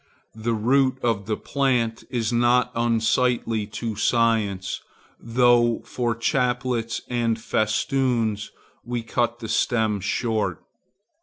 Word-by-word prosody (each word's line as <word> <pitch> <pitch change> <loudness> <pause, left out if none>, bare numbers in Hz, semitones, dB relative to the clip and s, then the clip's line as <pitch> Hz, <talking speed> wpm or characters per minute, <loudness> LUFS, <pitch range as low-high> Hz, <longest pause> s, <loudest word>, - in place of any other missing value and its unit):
The 115 +1 -2
root 130 +4 +2
of 110 -4 0
the 110 - -1
plant 125 -5 0
is 120 -2 -1
not 120 +1 +3
unsightly 115 -1 +1
to 110 +1 -4
science, 110 -4 +1 0.4
though 120 0 +3
for 120 -2 -1
chaplets 125 -2 0
and 120 -2 0
festoons 110 -1 0 0.3
we 120 -1 -3
cut 120 +1 -1
the 115 -2 -7
stem 110 -2 +1
short. 105 -2 -1
115 Hz, 105 wpm, -24 LUFS, 110-125 Hz, 0.4 s, not